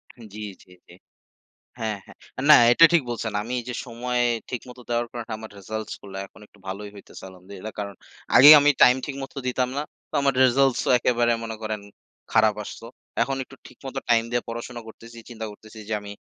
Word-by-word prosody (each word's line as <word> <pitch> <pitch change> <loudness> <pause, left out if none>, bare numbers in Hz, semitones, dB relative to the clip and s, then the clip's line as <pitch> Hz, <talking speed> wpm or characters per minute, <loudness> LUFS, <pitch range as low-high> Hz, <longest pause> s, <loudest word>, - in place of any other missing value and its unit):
হান 115 -3 -13
জ্বী, 110 - -8 0.2
জ্বী, 90 - -23 0.2
জ্বী। 85 - -15 0.8
হ্যাঁ, 110 -3 -3
হ্যাঁ - - -16 0.2
আ - - -2
না, - - +12 0.2
এটা 165 - +7
ঠিক 165 -4 +4
বলছেন। 115 -2 -3
আমি 120 +3 -7
এইযে 120 +1 -7
সময়ে 120 +1 -1 0.3
ঠিক 125 - -3
মত 125 0 -12
দেওয়ার 120 0 0
কারণে 120 -1 -7
আমার 110 0 -10
results 110 +2 -6
গুলা 95 -1 -8
এখন - - -20
একটু 105 - -26
ভালোই 100 +2 -6
হইতাছে, 100 - -13
الحمد 90 +1 -17
لله 110 +4 -7
কারণ, 100 -1 -5 0.4
আগে 140 +4 +10
আমি 145 +1 +5
time 125 +1 +7
ঠিকমত 135 -1 -7
দিতাম 125 0 0
না। - - 0 0.3
তো, - - -15
আমার 140 -1 +2
results 135 +1 +3
ও - - +3
একেবারে 120 -1 +2
মনে 110 -1 -5
করেন, 110 -1 -3 0.5
খারাপ 110 -2 +4
আসতো। 115 - -9 0.4
এখন 135 0 -1
একটু 135 - -16
ঠিক - - -17
মতো 135 0 -5
time 115 -1 +4
দিয়ে 120 0 0
পড়াশোনা 120 +1 -6
করতেছি, 115 +1 -13
চিন্তা 110 -1 -7
করতেছি 110 +1 -14
যে, - - -3
আমি 100 0 -9
115 Hz, 205 wpm, -24 LUFS, 110-125 Hz, 0.8 s, না